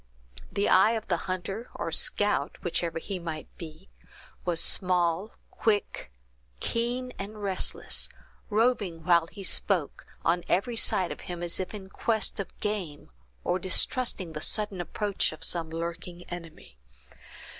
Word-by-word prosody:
The 200 - +1
eye 195 +5 +7
of 220 -4 -3
the 175 - +4
hunter, 195 +5 -3
or - - -2
scout, - - +2
whichever 165 -1 -1
he 190 +3 -3
might 160 -2 -6
be, 165 +3 -9 0.6
was 175 -2 +1
small, 180 +2 +3 0.2
quick, 205 - 0 0.5
keen, 245 +2 -1
and 205 +2 -6
restless, 190 -2 +1 0.4
roving 210 -7 +2
while 170 -1 +5
he 200 +3 -9
spoke, 185 -4 0 0.2
on 170 +1 +3
every 230 +6 +2
side 185 -5 +3
of - - -6
him, 175 -1 -4
as 170 - 0
if 185 - -2
in 195 -2 -7
quest 220 +2 0
of 200 - -5
game, 185 - -3 0.3
or 180 - +1
distrusting 185 -1 0
the 155 - -4
sudden 205 0 0
approach 200 +3 0
of 155 - -9
some 165 -2 +2
lurking 170 +2 -5
enemy. 165 - -9
185 Hz, 140 wpm, -29 LUFS, 170-210 Hz, 0.6 s, eye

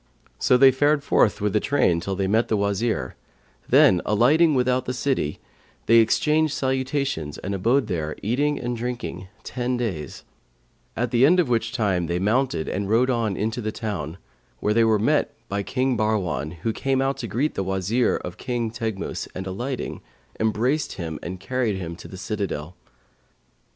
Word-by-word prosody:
So 125 - +4
they 135 +1 +7
fared 145 +2 +2
forth 110 -7 +2
with 105 -1 0
the 105 - +3
train 95 -10 +2
till 95 +3 -3
they 95 0 -1
met 110 +5 +2
the 110 - +1
Wazir; 100 +3 -1 0.5
then, 90 -2 +6
alighting 145 +9 +4
without 125 0 +1
the 125 - -3
city, 125 - -1 0.5
they 115 - +6
exchanged 150 +7 +3
salutations 130 - -1
and 100 - -4
abode 115 +8 +2
there, 80 -7 -3
eating 145 +7 +1
and 120 -1 -3
drinking, 120 -6 -5 0.2
ten 125 0 -2
days; 90 - -4 0.7
at 120 0 -1
the 120 +1 +3
end 175 +6 +6
of 165 -8 +2
which 115 -1 0
time 95 -7 0
they 85 +1 -1
mounted 110 -2 0
and 100 0 -2
rode 120 +4 +3
on 115 -5 -1
into 110 +4 -2
the 110 -1 -2
town, 95 -8 -4 0.4
where 105 - +1
they 115 +1 +4
were 110 -1 +4
met 145 +8 +1
by 100 -1 -2
King 130 +5 0
Bahrwan, 90 - -1
who 115 - 0
came 135 +2 0
out 135 +1 0
to 115 - -5
greet 125 +10 -1
the - - -2
Wazir 95 +6 +1
of 90 - -7
King 120 -3 -2
Teghmus 110 -4 -4
and 95 - -5
alighting, 120 +8 -4 0.4
embraced 120 +7 0
him 80 -3 -5
and 90 +1 -6
carried 115 +1 -1
him 85 -3 -5
to - - -10
his 95 -1 -9
citadel. 95 -6 -4
115 Hz, 175 wpm, -24 LUFS, 95-130 Hz, 0.7 s, they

